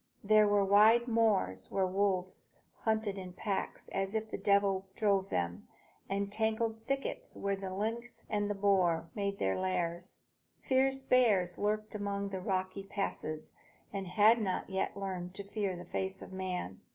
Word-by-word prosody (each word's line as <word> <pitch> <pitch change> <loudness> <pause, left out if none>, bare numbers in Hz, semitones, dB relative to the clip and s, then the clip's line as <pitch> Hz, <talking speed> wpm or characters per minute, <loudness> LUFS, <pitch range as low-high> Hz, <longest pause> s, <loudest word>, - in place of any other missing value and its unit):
There 215 0 +5
were 205 -1 +3
wide 220 +4 +6
moors 210 - +2
where 190 - +2
the 185 - -3
wolves 185 -2 0 0.4
hunted 220 -3 0
in 180 -1 -8
packs 195 +1 -3
as 195 +2 -2
if 220 0 -2
the - - -2
devil 200 -1 +2
drove 200 -3 +2
them, 85 0 -2 0.4
and 200 +1 -1
tangled 220 +1 0
thickets 275 0 -2
where 200 0 0
the 195 -1 -6
lynx 230 +5 -4
and 205 -1 0
the 205 - -1
boar 180 -5 +2
made 200 -1 -2
their 95 - +1
lairs. 180 -1 -2 0.5
Fierce 270 0 +2
bears 210 -9 +3
lurked 215 +1 -1
among 200 -1 -2
the 190 -1 -4
rocky 185 +1 -1
passes, 195 -6 -4 0.4
and 195 -1 -3
had 215 +5 +5
not 190 -1 -2
yet 190 +1 -1
learned 185 -2 -4
to 200 - -4
fear 200 -1 -2
the 175 0 -8
face 190 0 -3
of - - -11
man. 180 - -4
200 Hz, 165 wpm, -33 LUFS, 185-215 Hz, 0.5 s, wide